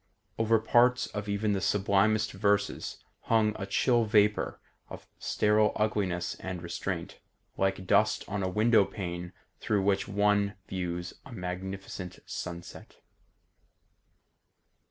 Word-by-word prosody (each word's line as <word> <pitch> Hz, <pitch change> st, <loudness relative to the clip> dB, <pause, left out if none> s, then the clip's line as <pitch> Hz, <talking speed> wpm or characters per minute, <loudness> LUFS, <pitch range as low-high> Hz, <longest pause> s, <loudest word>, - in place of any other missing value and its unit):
Over 115 Hz, 0 st, +4 dB
parts 120 Hz, +3 st, +3 dB
of 105 Hz, 0 st, -6 dB
even 100 Hz, +1 st, 0 dB
the 95 Hz, -, -1 dB
sublimest 105 Hz, +2 st, +2 dB
verses 100 Hz, +1 st, -1 dB, 0.2 s
hung 110 Hz, -2 st, +2 dB
a 95 Hz, -, -3 dB
chill 120 Hz, +4 st, +3 dB
vapour 105 Hz, -1 st, +2 dB, 0.3 s
of -, -, -9 dB
sterile 105 Hz, 0 st, +2 dB
ugliness 100 Hz, -5 st, 0 dB
and 95 Hz, -1 st, -5 dB
restraint, 85 Hz, 0 st, -4 dB, 0.4 s
like 95 Hz, -1 st, 0 dB
dust 110 Hz, +3 st, +3 dB
on 100 Hz, +1 st, -3 dB
a 95 Hz, -, 0 dB
window 110 Hz, +2 st, +4 dB
pane 90 Hz, -3 st, -5 dB, 0.3 s
through 105 Hz, -3 st, 0 dB
which 100 Hz, 0 st, +1 dB
one 100 Hz, 0 st, +2 dB
views 90 Hz, -1 st, -4 dB
a -, -, -13 dB
magnificent 95 Hz, -1 st, -6 dB
sunset. 85 Hz, -1 st, -7 dB
100 Hz, 115 wpm, -29 LUFS, 95-105 Hz, 0.4 s, Over